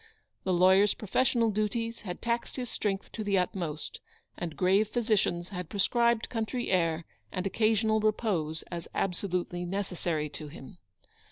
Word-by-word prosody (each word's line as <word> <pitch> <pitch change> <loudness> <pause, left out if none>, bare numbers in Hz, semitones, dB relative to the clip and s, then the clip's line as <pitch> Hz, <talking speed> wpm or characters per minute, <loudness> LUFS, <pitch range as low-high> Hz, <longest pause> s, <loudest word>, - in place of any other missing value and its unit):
The 190 - +1
lawyer's 190 +3 +5
professional 235 +2 +2
duties 230 +3 -1
had 180 -4 -6
taxed 235 0 -1
his 250 -2 -4
strength 195 -2 -2
to 220 - -4
the 200 -1 +2
utmost, 175 -4 -2 0.4
and 165 -4 -5
grave 195 +5 +4
physicians 210 -6 +1
had 180 -4 -5
prescribed 235 +3 +2
country 235 +1 -2
air 165 -3 +2 0.3
and 185 - -3
occasional 220 +2 +2
repose 200 -8 0
as 170 -1 -5
absolutely 180 -1 -1
necessary 175 -4 -2
to 150 +1 -7
him. 150 +3 -11
195 Hz, 140 wpm, -30 LUFS, 175-220 Hz, 0.4 s, lawyer's